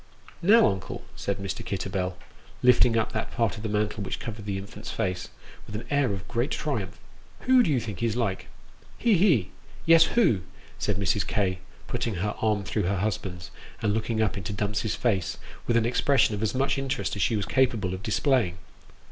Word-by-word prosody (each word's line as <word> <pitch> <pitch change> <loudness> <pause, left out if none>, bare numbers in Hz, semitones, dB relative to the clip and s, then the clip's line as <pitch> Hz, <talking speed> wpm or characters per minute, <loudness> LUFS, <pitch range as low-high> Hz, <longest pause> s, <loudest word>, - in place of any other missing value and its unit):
Now, 215 +6 +6
uncle," 95 -1 -2
said 100 - -2
Mr. 100 -1 -4
Kitterbell, 95 -2 -3 0.5
lifting 125 -2 +5
up 110 - 0
that 110 - -3
part 115 -2 0
of 110 - -8
the 110 - -3
mantle 105 0 -1
which 95 - -4
covered 110 -2 -6
the 100 -1 -1
infant's 105 +3 -8
face, 90 -1 -2 0.4
with 105 - -7
an 105 - -5
air 140 -5 +2
of 95 -1 -5
great 120 +4 -1
triumph, 115 -11 -3 0.2
" - - -27
Who 255 -1 +5
do 195 - +2
you 135 -4 +3
think 105 -4 -6
he's 115 -2 0
like? 110 -6 -1 0.2
" - - -26
" - - -24
He! 235 -2 +3
he! 165 - +3 0.3
Yes, 165 0 +7
who? 160 - +4 0.2
" - - -22
said - - 0
Mrs. 100 0 +1
K., 95 -4 0 0.3
putting 120 -3 -2
her 105 +4 -1
arm 105 -2 +1
through 100 -1 -1
her 100 - 0
husband's, 95 -3 -3 0.3
and 105 -1 +2
looking 110 0 0
up 105 - -1
into 95 +1 -4
Dumps's 105 +1 -1
face 100 -7 0 0.3
with 115 - +3
an 115 - +2
expression 125 0 +3
of 105 - -3
as 110 +2 0
much 135 +1 +1
interest 135 -3 -2
as 100 - -3
she 110 - +2
was 100 -2 -1
capable 115 -6 +1
of 95 - -5
displaying. 110 - +1
105 Hz, 205 wpm, -27 LUFS, 100-125 Hz, 0.5 s, Yes